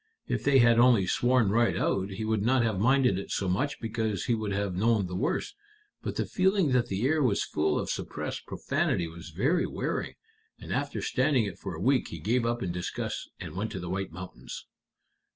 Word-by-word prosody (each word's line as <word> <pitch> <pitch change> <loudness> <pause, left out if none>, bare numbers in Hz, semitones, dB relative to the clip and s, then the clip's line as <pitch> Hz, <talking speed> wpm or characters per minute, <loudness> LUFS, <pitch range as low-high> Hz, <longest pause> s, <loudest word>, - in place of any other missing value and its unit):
If - - -2
they 140 -1 +5
had 120 -2 +6
only 120 -6 +5
sworn 120 +1 +2
right 115 +2 +2
out, 95 0 0
he 100 +3 -4
would 110 -1 0
not 125 +3 +3
have 110 -5 0
minded 125 -3 +3
it 100 - -7
so 95 - -1
much, 130 +11 0
because 110 -2 -2
he 120 - +2
would 110 -2 -2
have 100 -1 -1
known 105 +2 +2
the 90 0 -5
worst. 165 - -1 0.5
But - - -4
the - - 0
feeling 190 -5 +2
that 125 -1 +2
the 100 +2 -1
air 155 +3 +2
was 120 -7 +2
full 75 0 0
of - - -2
suppressed - - -4
profanity 85 - 0
was 85 +1 -10
very 135 - +1
wearing, - - -3 0.4
and - - -6
after - - -2
standing 150 - +2
it 100 - -6
for - - -5
a - - -7
week - - +2
he - - -7
gave 115 +3 0
up 120 0 -1
in 90 - -2
disgust 90 0 -4
and 75 - -7
went 105 +4 -2
to 95 - -4
the 90 0 -5
White 95 -1 -3
Mountains." 90 +2 -8
110 Hz, 210 wpm, -28 LUFS, 95-125 Hz, 0.5 s, had